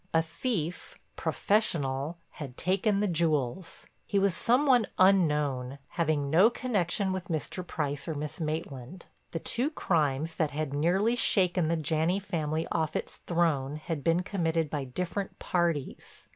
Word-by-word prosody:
A 165 - +5
thief, 175 -1 -3 0.2
professional, 155 -7 0
had 135 -5 -8
taken 200 +3 +1
the 210 - +2
jewels. 165 -2 -1 0.2
He 200 - 0
was 195 -2 +3
some 250 +9 +3
one 250 -5 +4
unknown, 150 -9 +3
having 155 -4 0
no 185 +8 +7
connection 200 -6 0
with 185 -2 -4
Mr. 165 +2 -3
Price 145 -3 -3
or 160 - -2
Miss 150 +2 -4
Maitland. 155 0 -4 0.2
The - - -4
two 240 - 0
crimes 160 - 0
that 155 - +2
had 150 -1 -3
nearly 185 +10 +2
shaken 185 -7 +3
the 165 +1 +1
Janney 160 +4 +1
family 160 -5 -2
off 160 -2 0
its - - -3
throne 155 -5 0
had 155 -1 -4
been 170 +2 +2
committed 165 -5 -1
by 145 -3 -2
different 180 +8 -4
parties. 170 -6 -2
165 Hz, 145 wpm, -29 LUFS, 150-190 Hz, 0.2 s, no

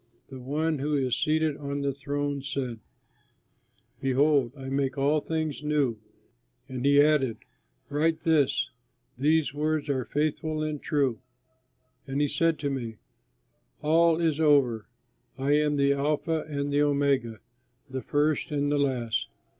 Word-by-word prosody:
The 130 - -9
One 150 +4 -1
who 150 +2 0
is 130 -3 +1
seated 155 -1 +1
on 140 0 -4
the 140 -1 0
throne 145 +1 -3
said: 130 -4 -4 1.2
"Behold, 135 -1 +2
I 135 -1 -8
make 135 0 -1
all 145 +2 +2
things 155 -2 -3
new!" 145 -7 0 0.7
And 130 -1 -5
he 140 +1 +5
added, 145 -6 +3 0.5
"Write 160 +2 0
this: 145 -5 +2 0.5
'These 155 +1 +2
words 155 0 -1
are 130 -2 0
faithful 155 +3 -1
and 155 -2 -3
true.'" 140 -6 0 0.9
And 135 +1 -2
he 145 - +3
said 165 +2 +1
to 140 -1 -1
me, 120 -5 -4 0.9
"All 165 +2 +4
is 160 -3 +1
over! 135 -8 +3 0.5
I 135 +2 0
am 150 -1 +1
the 140 0 +3
Alpha 150 +3 -1
and 140 -1 -2
the 145 - +3
Omega, 140 -6 +1 0.5
the 130 0 -5
First 145 +4 0
and 145 -1 0
the 145 - +2
Last. 120 -4 -1
145 Hz, 140 wpm, -27 LUFS, 135-150 Hz, 1.2 s, he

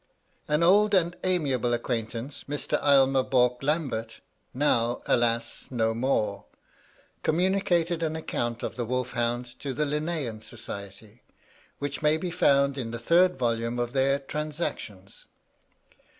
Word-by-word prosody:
An 150 +2 +2
old 205 +4 +5
and 175 -1 +2
amiable 135 -10 +1
acquaintance, 120 +2 -4
Mr. 145 +1 -1
Aylmer 135 -2 +5
Bourke 125 -1 +2
Lambert, 135 -7 -2 0.3
now, 120 -3 +1
alas! 115 -1 0
no 115 -3 0
more, 110 -4 -1 0.8
communicated 175 -1 +1
an 160 -1 -1
account 120 -7 -3
of - - -4
the 120 - -2
wolf 125 +1 -2
hound 120 0 -1
to 135 -3 -4
the 150 - 0
Linnean 150 -6 -2
Society, 105 0 -7 0.6
which 145 0 -4
may 150 +1 +3
be 175 +2 -4
found 140 -5 +3
in 115 -3 -3
the 120 - -4
third 170 +8 +3
volume 115 -1 -1
of 120 0 -2
their 135 0 +2
"Transactions." 140 - -5
135 Hz, 130 wpm, -27 LUFS, 120-155 Hz, 0.8 s, old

